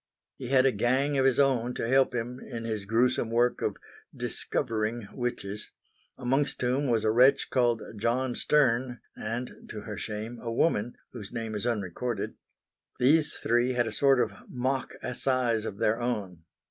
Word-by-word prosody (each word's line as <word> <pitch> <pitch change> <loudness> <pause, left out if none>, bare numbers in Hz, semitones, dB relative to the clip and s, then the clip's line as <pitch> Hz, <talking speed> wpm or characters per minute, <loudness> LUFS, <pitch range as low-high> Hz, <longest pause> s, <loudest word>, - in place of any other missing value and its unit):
He 130 - -6
had 130 0 +4
a 135 - +5
gang 130 +6 +1
of 135 - +3
his 135 -1 +3
own 125 -3 +2
to - - -2
help 135 +1 +3
him 120 +2 -3
in 115 -2 -7
his 110 -3 -3
gruesome 115 +2 +2
work 120 +2 +2
of - - -1 0.4
"discovering" 110 0 -1
witches; 105 -5 -4 0.5
amongst 135 +3 0
whom 130 +3 +1
was 115 -2 +2
a 110 - +3
wretch 130 +4 +4
called 120 -3 +2
John 120 +4 0
Stern 125 -4 +2 0.2
and 115 +3 -5
to 105 - -6
her 105 -1 -6
shame 110 +2 -5
a 115 - -4
woman, 115 -3 +1
whose 105 -5 -8
name 115 -2 -4
is 105 +3 -2
unrecorded. 110 +1 -2 0.6
These 150 +4 +4
three 120 +2 +1
had 120 -1 +2
a 115 - -3
sort 135 +3 +4
of 110 -4 +1 0.2
mock 130 +1 -2
assize 125 -3 0
of 100 - -5
their 110 +3 +1
own. 100 -9 -3
120 Hz, 165 wpm, -28 LUFS, 110-130 Hz, 0.6 s, a